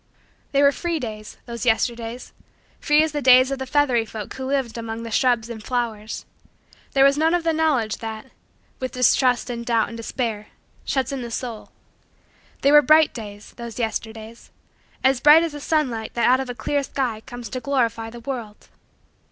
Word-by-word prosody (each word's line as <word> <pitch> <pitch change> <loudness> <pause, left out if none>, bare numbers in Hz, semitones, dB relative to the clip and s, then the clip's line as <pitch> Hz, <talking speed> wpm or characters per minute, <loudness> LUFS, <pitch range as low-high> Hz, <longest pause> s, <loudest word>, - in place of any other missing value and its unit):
They 280 0 +3
were 280 - +6
free 340 +2 -2
days 215 -4 -7
those 235 -2 -6
Yesterdays 235 0 -1 0.5
free 300 0 +4
as 315 - -1
the 295 0 -3
days 255 0 +6
of 275 - -2
the 265 - -5
feathery 255 -4 +2
folk 215 -2 -7
who 265 0 -5
lived 265 -4 -1
among 230 0 -5
the 230 - -7
shrubs 240 -1 +2
and 235 -2 -7
flowers. 225 -4 -3 0.7
There 270 - +5
was 275 +1 +4
none 325 +2 +3
of 350 - -1
the 330 -1 +1
knowledge 285 -9 +1
that, 225 +3 -7 0.5
with 255 -1 -4
distrust 250 0 +2
and 235 -1 -5
doubt 230 -2 +1
and 230 - -8
despair, 225 -2 -3 0.4
shuts 265 -2 -1
in 275 -2 -4
the 240 - -6
soul. 230 -1 -5 0.9
They 280 - +4
were 295 0 +8
bright 310 +2 +5
days 210 -3 -9
those 235 -1 -8
Yesterdays 225 0 -5 0.5
as 265 -1 +3
bright 300 +5 +7
as 335 - -2
the 290 - -7
sunlight 260 -9 -1
that 235 - +2
out 255 +1 +5
of 265 -1 -4
a 245 - -5
clear 285 +5 -1
sky 255 -5 -3
comes 245 -1 -8
to 255 - -4
glorify 235 -4 -1
the 235 +1 -11
world. 230 -5 -7
245 Hz, 185 wpm, -22 LUFS, 225-275 Hz, 0.9 s, were